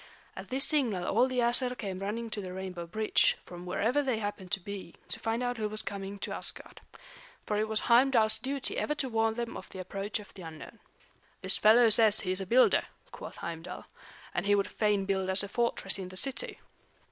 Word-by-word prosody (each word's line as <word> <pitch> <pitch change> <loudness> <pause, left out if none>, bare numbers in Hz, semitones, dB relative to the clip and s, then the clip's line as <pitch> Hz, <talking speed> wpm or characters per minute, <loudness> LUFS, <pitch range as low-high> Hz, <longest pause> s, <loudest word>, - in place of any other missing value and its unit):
At - - -8
this 265 +2 +1
signal 230 -12 +1
all 240 +7 +3
the 255 -1 -4
Æsir 245 +1 +2
came 195 -4 -5
running 220 +4 -4
to 210 - -3
the 185 -2 -7
rainbow 185 -2 -6
bridge, 215 +5 +2
from 175 0 -10
wherever 230 +10 +1
they 260 -5 0
happened 205 -3 -5
to 200 - +1
be, 195 -2 -8
to - - -2
find 225 +2 -1
out 245 0 -2
who 215 -1 -2
was 215 0 -2
coming 200 0 -5
to - - -4
Asgard. - - -5 0.6
For 210 - -1
it 215 +1 0
was 220 0 +1
Heimdal's 235 -2 +4
duty 270 +1 -1
ever 300 - -1
to 280 -2 -2
warn 225 -1 +1
them 235 0 -4
of - - -9
the - - -10
approach 195 +3 -4
of 210 -1 -12
the 190 - -11
unknown. 165 +6 -10 0.6
"This - - +5
fellow 230 +2 +6
says 220 -1 +6
he 185 - -2
is 185 +1 +2
a 190 - -5
builder," 250 +5 +4 0.3
quoth - - -9
Heimdal. 165 -1 -6 0.5
"And 175 +3 -2
he 205 - +5
would 200 -1 +1
fain 210 -2 0
build 190 -1 -1
us 190 +2 +3
a - - -4
fortress 200 -3 -1
in 185 -1 -6
the 185 - -5
city." 275 - +2
210 Hz, 215 wpm, -30 LUFS, 190-235 Hz, 0.6 s, fellow